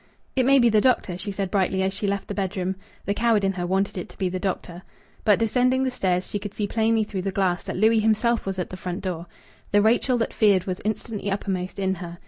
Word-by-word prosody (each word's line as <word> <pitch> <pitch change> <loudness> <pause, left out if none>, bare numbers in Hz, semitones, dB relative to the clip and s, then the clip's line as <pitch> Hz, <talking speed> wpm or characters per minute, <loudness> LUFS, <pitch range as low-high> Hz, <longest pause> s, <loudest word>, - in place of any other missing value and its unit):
"It 260 -2 +2
may 275 0 +6
be 240 -3 +5
the 215 -1 +4
doctor," 245 -8 +2
she 200 +3 -4
said 195 -1 -3
brightly, 190 -1 +1
as 190 0 0
she 205 +1 -2
left 200 0 -2
the - - -4
bedroom. 190 -1 -2 0.3
The 200 - +1
coward 225 -1 +2
in 195 0 +2
her 175 -1 -3
wanted 190 +1 0
it - - -7
to - - -16
be 190 -2 0
the 185 +1 -3
doctor. 180 -2 -3 0.4
But, 210 -2 +5
descending 250 +3 +2
the 260 - 0
stairs, 185 -6 0
she 205 - -3
could 205 0 -7
see 210 - -1
plainly 225 +1 +2
through 200 -3 -4
the 195 +1 -2
glass 185 -2 +1
that - - -4
Louis 220 +3 +4
himself 220 +1 +1
was 190 -1 -2
at 180 - -3
the 185 - -6
front 180 0 -5
door. 175 -2 -4 0.4
The 205 - +5
Rachel 240 +4 +3
that 230 - -1
feared 200 -4 +4
was 185 -1 -4
instantly 215 -1 -3
uppermost 190 -2 -3
in 190 -1 0
her. 175 -1 -7
200 Hz, 250 wpm, -24 LUFS, 185-220 Hz, 0.4 s, may